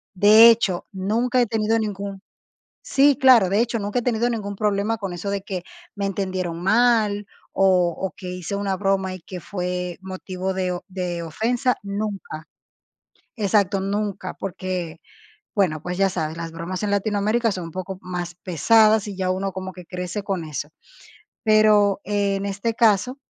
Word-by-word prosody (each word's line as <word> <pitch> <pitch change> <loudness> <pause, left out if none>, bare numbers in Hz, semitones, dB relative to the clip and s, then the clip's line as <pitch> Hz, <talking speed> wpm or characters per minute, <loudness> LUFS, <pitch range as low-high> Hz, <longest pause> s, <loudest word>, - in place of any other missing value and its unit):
De 215 +4 +8
hecho, 220 -6 +2
nunca 225 +6 +1
he - - +3
tenido 225 +1 +1
ningún 200 -2 -4 0.7
Sí, 280 - +4
claro, 255 -8 +6
de 200 +3 +2
hecho, 235 0 0
nunca 205 +3 -1
he - - -8
tenido 235 0 +1
ningún 205 -3 -4
problema 210 +2 0
con 195 -4 -4
eso 190 +3 -4
de 200 0 -1
que 190 -3 -5 0.3
me 200 - -2
entendieron 185 -3 -3
mal 215 0 +3 0.3
o 180 -3 +3
o 190 -1 -3
que 185 -3 -8
hice 180 +2 -4
una 200 -1 -1
broma 190 -1 0
y 185 - -9
que 180 +2 -8
fue 180 0 -4
motivo 190 0 -4
de 185 -1 -1
o 175 - -5
de 180 -2 -3
ofensa, 235 - 0
nunca. 200 -6 -5 0.9
Exacto, 200 -2 +2
nunca, 200 0 -2
porque, 180 -3 -4 0.6
bueno, 170 -7 +1
pues, 180 +1 -4
ya 195 0 +3
sabes, 160 -3 -3
las 165 -1 -6
bromas 170 +3 -5
en 210 - -1
Latinoamérica 215 +3 +1
son 185 -2 -5
un - - -8
poco 185 +1 -5
más 175 -1 -5
pesadas 215 +5 +4
y 200 - -6
ya 185 -1 -1
uno 190 +1 -1
como 190 0 -6
que 180 -2 -12
crece 180 +3 -4
con 190 -5 -2
eso. 150 -1 -5 0.8
Pero, 215 -2 +4
en 200 -1 0
este 200 +3 -2
caso, 225 +2 +3
195 Hz, 165 wpm, -23 LUFS, 180-215 Hz, 0.9 s, De